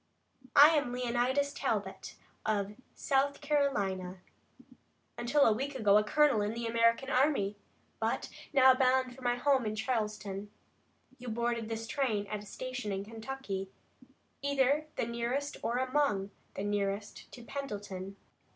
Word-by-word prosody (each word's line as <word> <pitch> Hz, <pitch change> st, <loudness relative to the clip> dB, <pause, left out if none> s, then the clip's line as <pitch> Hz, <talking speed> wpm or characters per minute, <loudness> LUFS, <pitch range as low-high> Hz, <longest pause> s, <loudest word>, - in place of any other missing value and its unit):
I 290 Hz, +1 st, +10 dB
am 295 Hz, -6 st, +1 dB
Leonidas 250 Hz, +3 st, 0 dB
Talbot, -, -, -3 dB, 0.3 s
of 205 Hz, -1 st, -1 dB, 0.2 s
South 280 Hz, +1 st, +1 dB
Carolina, 200 Hz, -12 st, 0 dB, 0.9 s
until 250 Hz, +5 st, +2 dB
a 220 Hz, -, +5 dB
week 270 Hz, +5 st, -3 dB
ago 210 Hz, -5 st, +4 dB
a -, -, +1 dB
colonel 295 Hz, -2 st, +3 dB
in 210 Hz, +2 st, -1 dB
the 235 Hz, 0 st, -3 dB
American 230 Hz, +3 st, +2 dB
army, 255 Hz, -7 st, +2 dB, 0.4 s
but -, -, -1 dB, 0.2 s
now 265 Hz, -2 st, +7 dB
bound 255 Hz, -1 st, +2 dB
for 265 Hz, -, -14 dB
my 245 Hz, -1 st, +1 dB
home 265 Hz, +1 st, +2 dB
in 215 Hz, -1 st, -2 dB
Charleston. 210 Hz, -3 st, -2 dB, 0.7 s
You 250 Hz, -, -9 dB
boarded 235 Hz, 0 st, -1 dB
this 225 Hz, 0 st, -3 dB
train 225 Hz, -5 st, 0 dB
at 210 Hz, -1 st, -3 dB
a 210 Hz, -, -12 dB
station 250 Hz, -2 st, -5 dB
in 195 Hz, 0 st, -3 dB
Kentucky, 220 Hz, -3 st, -5 dB, 0.7 s
either 280 Hz, +2 st, +2 dB
the -, -, -1 dB
nearest 235 Hz, +5 st, -2 dB
or 235 Hz, +1 st, -1 dB
among 255 Hz, -7 st, +1 dB, 0.2 s
the 195 Hz, -, -3 dB
nearest 205 Hz, 0 st, -3 dB
to 240 Hz, -, -10 dB
Pendleton. 205 Hz, -8 st, -6 dB
240 Hz, 140 wpm, -32 LUFS, 210-270 Hz, 0.9 s, I